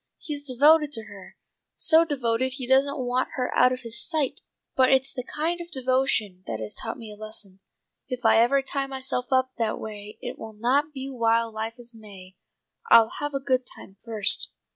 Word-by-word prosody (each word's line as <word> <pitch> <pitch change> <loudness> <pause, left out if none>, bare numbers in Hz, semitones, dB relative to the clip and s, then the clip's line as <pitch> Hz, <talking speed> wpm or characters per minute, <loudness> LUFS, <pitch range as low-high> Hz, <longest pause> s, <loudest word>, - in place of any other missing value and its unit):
He's 290 -2 -4
devoted 295 +4 +4
to 225 - -4
her, 205 -3 -13 0.4
so 320 0 +4
devoted 260 -4 -1
he 265 -2 -5
doesn't 275 +2 +3
want 255 0 -1
her 250 -1 -2
out 250 +1 +5
of 255 0 -4
his 230 -2 -2
sight; 310 -5 -2 0.3
but 260 -1 +4
it's 265 0 +2
the 250 - -5
kind 330 +6 -3
of 345 - -9
devotion 255 - 0
that 110 -1 -4
has 110 -1 -5
taught 225 - -5
me 225 -3 -10
a - - -10
lesson. 210 -3 -11 0.5
If 250 -2 -6
ever 230 +4 +5
I - - +2
tie 275 0 -2
myself 260 -2 -2
up 260 0 +2
that 225 -2 -1
way 210 0 -8
it 245 - -7
will 220 0 -8
not 260 +8 +1
be 270 -2 -6
while 230 -2 +1
life 220 +2 -5
is 240 0 -10
May. 195 -4 -14 0.5
I'll 225 -1 +7
have 290 -1 -3
a - - 0
good 260 -2 0
time 195 - -12
first." 220 -3 +5
250 Hz, 195 wpm, -25 LUFS, 220-270 Hz, 0.5 s, I'll